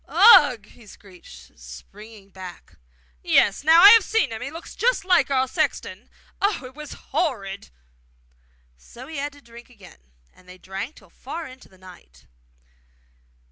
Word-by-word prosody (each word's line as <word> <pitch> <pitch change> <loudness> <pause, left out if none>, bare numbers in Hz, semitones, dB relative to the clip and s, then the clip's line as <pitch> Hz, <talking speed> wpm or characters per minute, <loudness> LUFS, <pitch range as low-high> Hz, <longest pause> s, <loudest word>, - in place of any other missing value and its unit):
'Ugh!' 255 - +5
he 220 +1 -20
shrieked, 180 - -16
springing 195 - -14
back. 185 - -13 0.4
'Yes, 200 - +1
now 325 +3 +5
I 400 - +10
have 450 -1 +7
seen 445 - -1
him; 220 - -7
he 250 - -5
looked 330 +3 -11
just - - -1
like 355 -7 +2
our 260 -1 0
sexton. - - -4 0.3
Oh, 400 -9 -1
it 255 - -12
was 300 +1 -10 0.2
horrid!' 200 - -3 1.1
So 240 - -14
he 315 +2 -9
had 285 +1 -5
to 285 - -18
drink 235 +1 -16
again, 205 - -18 0.3
and 180 0 -23
they 180 - -13
drank 195 +9 -8
till - - -20
far 335 -1 -8
on 260 - -11
into 255 0 -17
the 190 - -22
night. 180 - -18
235 Hz, 160 wpm, -22 LUFS, 195-300 Hz, 1.1 s, I